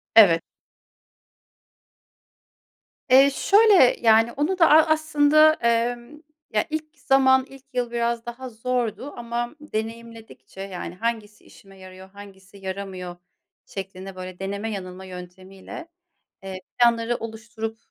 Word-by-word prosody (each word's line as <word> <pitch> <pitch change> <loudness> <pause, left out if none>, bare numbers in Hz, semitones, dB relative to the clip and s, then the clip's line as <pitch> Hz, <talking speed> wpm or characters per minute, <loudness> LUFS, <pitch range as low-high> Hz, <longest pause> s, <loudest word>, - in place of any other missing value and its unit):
Evet. 170 -7 +7 2.7
Eee, 270 +2 +7
şöyle, 395 - +5
yani, 225 0 +4
onu 300 +9 -1
da, 330 - +6
a 310 +1 +7
aslında, 310 0 +4
emm, 240 +2 -1 0.4
ya, 210 0 +1
ilk 310 0 -6
zaman, 265 0 +4
ilk 270 -1 -14
yıl 245 -1 -2
biraz 235 0 -1
daha 245 +2 -7
zordu 245 +3 -3
ama 240 +2 -4
deneyimledikçe, 230 -6 -8
yani, 185 -3 -7
hangisi 220 0 -4
işime 195 -1 -18
yarıyor, 185 0 -13
hangisi 195 0 -14
yaramıyor 190 -2 -6 0.5
şeklinde, 190 0 -8
böyle, 185 -1 -8
deneme 200 +3 -4
yanılma 190 -2 -7
yöntemiyle, 185 - -10 0.6
eee, 190 -1 -7 0.2
planları 235 0 +3
oluşturup, 225 0 -6
230 Hz, 110 wpm, -23 LUFS, 195-260 Hz, 2.7 s, Evet